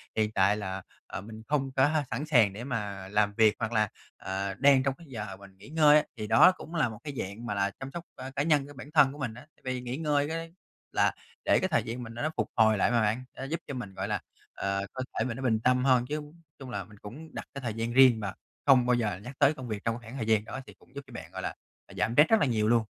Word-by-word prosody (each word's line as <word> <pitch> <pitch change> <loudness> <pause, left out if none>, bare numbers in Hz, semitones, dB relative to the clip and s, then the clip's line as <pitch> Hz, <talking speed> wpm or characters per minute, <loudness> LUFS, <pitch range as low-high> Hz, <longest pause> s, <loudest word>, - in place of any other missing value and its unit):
hiện 110 -1 +1
tại 100 0 +3
là, 95 -2 -4 0.3
à, - - -5
mình 110 +2 -10
không 135 -2 0
có 135 +1 +4
h 155 +1 +1
sẵn 145 - -2
sàng 120 -10 +4
để 110 +4 -7
mà 105 -7 -4
làm 105 0 +2
việc 110 -2 +5
hoặc 110 - -2
là, 110 -2 +2 0.3
ờ, 95 +1 -3
đang 135 +3 +5
trong 135 0 +1
cái 170 -1 -15
giờ 105 -6 -6
mình 100 -1 -15
nghỉ 100 +6 -14
ngơi 150 -1 +6
á, 150 - +3
thì 105 -1 -4
đó 180 - +7
cũng 165 - -9
là 150 -7 +2
một 110 -1 -9
cái 145 - -5
dạng 100 +5 -5
mà 110 - -2
là 100 0 0
chăm 135 0 -6
sóc, 170 +3 -6
ơ, 130 - -7
cá 145 - +1
nhân 150 -3 +2
của 145 - -11
bản 135 +3 -10
thân 135 -1 +5
của 145 - -11
mình 125 -5 -3
á. 125 +6 -13
Tại - - -32
vì 125 - -4
nghỉ 125 +1 -4
ngơi 145 -2 +1
cái 165 +1 -5 0.4
là - - +3 0.3
để - - +4
cái 185 - +1
thời 155 - +2
gian 120 +2 -5
mình 115 -1 -8
nó 120 - -6
nó 155 - +1
phục - - 0
hồi 110 -1 +5
lại 100 - +2
mà 120 -1 +3
bạn, 110 +4 +1
nó - - -5
giúp 155 +5 -3
cho 145 - -5
mình, 125 -7 -6
gọi - - -3
là, - - -1 0.3
ờ, 100 0 -2
cơ 130 - -3 0.2
thể 110 - +2
mình 120 -1 -3
nó 135 - -6
bình 115 -4 +2
tâm 125 +2 +2
hơn, 130 -2 +4
chứ 150 +1 -2 0.4
chung 135 -2 -8
là 100 -5 -3
mình 105 +2 -16
cũng 140 +11 -10
đặt - - -6
cái 140 - -6
thời 120 -4 -3
gian 115 +2 -3
riêng 130 -3 +7
và 100 -2 -3 0.3
không 130 -3 +6
bao 125 - +3
giờ 105 -6 -1
nhắc 125 +4 -8
tới 145 +1 +5
công 130 -4 -8
việc 110 -2 -4
trong 115 -1 +1
cái - - -7
khoảng 130 - -7
thời 115 - -2
gian 110 -2 +3
đó, 130 - -6
thì - - -11
cũng 130 - -25
giúp 140 - -5
cho - - -14
bạn, - - -8
gọi - - -6
là, - - -4 0.3
à, - - -14
giảm 105 +6 0
stress 150 +4 +7
rất 225 - +5
là - - +3
nhiều 110 -5 +1
luôn. 115 0 +4
120 Hz, 300 wpm, -29 LUFS, 105-140 Hz, 0.4 s, đó